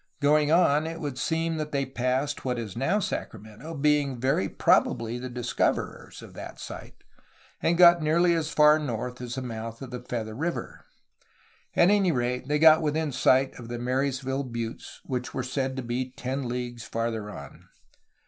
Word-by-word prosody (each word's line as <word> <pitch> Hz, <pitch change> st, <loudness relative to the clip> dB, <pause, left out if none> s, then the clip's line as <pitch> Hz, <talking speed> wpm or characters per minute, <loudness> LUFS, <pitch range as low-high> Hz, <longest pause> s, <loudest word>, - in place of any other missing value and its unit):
Going 150 Hz, +1 st, +3 dB
on, 160 Hz, -3 st, +4 dB
it 165 Hz, 0 st, -5 dB
would 145 Hz, -5 st, -4 dB
seem 165 Hz, +2 st, -1 dB
that 155 Hz, -1 st, -4 dB
they 140 Hz, -1 st, 0 dB
passed 130 Hz, +2 st, -1 dB
what 125 Hz, -2 st, -1 dB
is 110 Hz, -5 st, -5 dB
now 135 Hz, -, +1 dB
Sacramento, 145 Hz, -, -5 dB
being 145 Hz, -3 st, +1 dB
very 130 Hz, -6 st, +1 dB
prob -, -, +4 dB
ably 115 Hz, +1 st, -4 dB
the 130 Hz, +1 st, -5 dB
discoverers 120 Hz, -1 st, -2 dB
of -, -, -12 dB
that -, -, -9 dB
site, -, -, -9 dB, 0.6 s
and 170 Hz, +1 st, +2 dB
got 175 Hz, -1 st, +7 dB
nearly 170 Hz, +3 st, +3 dB
as 160 Hz, -2 st, -1 dB
far 150 Hz, 0 st, +5 dB
north 125 Hz, -3 st, -4 dB
as 125 Hz, -1 st, -5 dB
the 130 Hz, -, -4 dB
mouth 115 Hz, -1 st, -6 dB
of 130 Hz, -, -9 dB
the 125 Hz, -1 st, -5 dB
Feather 115 Hz, -3 st, -4 dB
River; 165 Hz, +9 st, -4 dB, 0.9 s
at 175 Hz, +3 st, +5 dB
any 200 Hz, -3 st, +3 dB
rate 125 Hz, -1 st, -1 dB
they 150 Hz, +1 st, +1 dB
got 160 Hz, +1 st, +7 dB
within 155 Hz, 0 st, 0 dB
sight 130 Hz, +1 st, +3 dB
of 120 Hz, -, -9 dB
the 120 Hz, 0 st, -4 dB
Marysville 130 Hz, +2 st, -1 dB
Buttes, 115 Hz, -2 st, -6 dB
which 125 Hz, -2 st, -4 dB
were 130 Hz, -, -1 dB
said 130 Hz, +1 st, -2 dB
to 130 Hz, -, -4 dB
be 125 Hz, +2 st, -2 dB
ten 130 Hz, 0 st, -4 dB
leagues 120 Hz, -1 st, -4 dB
farther 115 Hz, -2 st, -3 dB
on. 105 Hz, -, -11 dB
130 Hz, 175 wpm, -27 LUFS, 120-150 Hz, 0.9 s, got